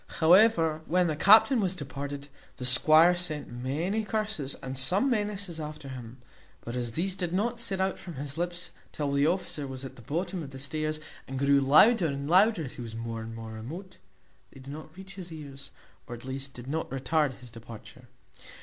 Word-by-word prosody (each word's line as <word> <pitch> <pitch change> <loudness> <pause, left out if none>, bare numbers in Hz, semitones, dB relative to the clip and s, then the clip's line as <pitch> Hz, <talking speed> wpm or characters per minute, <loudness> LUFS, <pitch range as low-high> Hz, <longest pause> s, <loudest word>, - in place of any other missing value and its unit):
However, 165 -2 +5
when 180 +2 +3
the 155 -3 0
captain 220 - +6
was 190 -3 0
departed, 140 -2 -6 0.3
the 125 - -4
squire 155 +7 +6
sent 160 -4 -2
many 150 - -2
curses 210 -10 -2
and 130 0 -4
some 185 - +2
menaces 200 -6 -2
after 150 -2 -7
him; 125 -2 -8 0.4
but 120 - -6
as 120 -2 -3
these 185 +8 0
did 175 -3 -3
not 230 +6 0
set 200 -5 -2
out 190 0 0
from 175 -3 -9
his 140 +1 -5
lips 175 +1 -3 0.2
till 145 -2 -2
the 140 +1 +3
officer 165 -5 -1
was 130 0 -6
at 130 0 -9
the - - -12
bottom 175 - -3
of 145 - -7
the 135 - -10
stairs, 155 +3 -2 0.3
and 135 - -5
grew 140 +1 +4
louder 165 - +6
and 140 -1 -4
louder 190 +2 +4
as 130 - -6
he - - -6
was 115 -2 -7
more 115 0 -4
and 115 0 -7
more 115 -1 -7
remote, 155 - -8 0.5
they - - -14
did 135 +2 -9
not 155 +2 -10
reach 190 0 -10
his 180 -2 -9
ears, 140 -3 -8 0.4
or 120 - -6
at 120 - -12
least 135 +1 -5
did 120 - -9
not 155 +4 -3
retard 135 +2 0
his 125 -2 -13
departure. 115 -1 -12
150 Hz, 200 wpm, -28 LUFS, 135-180 Hz, 0.5 s, captain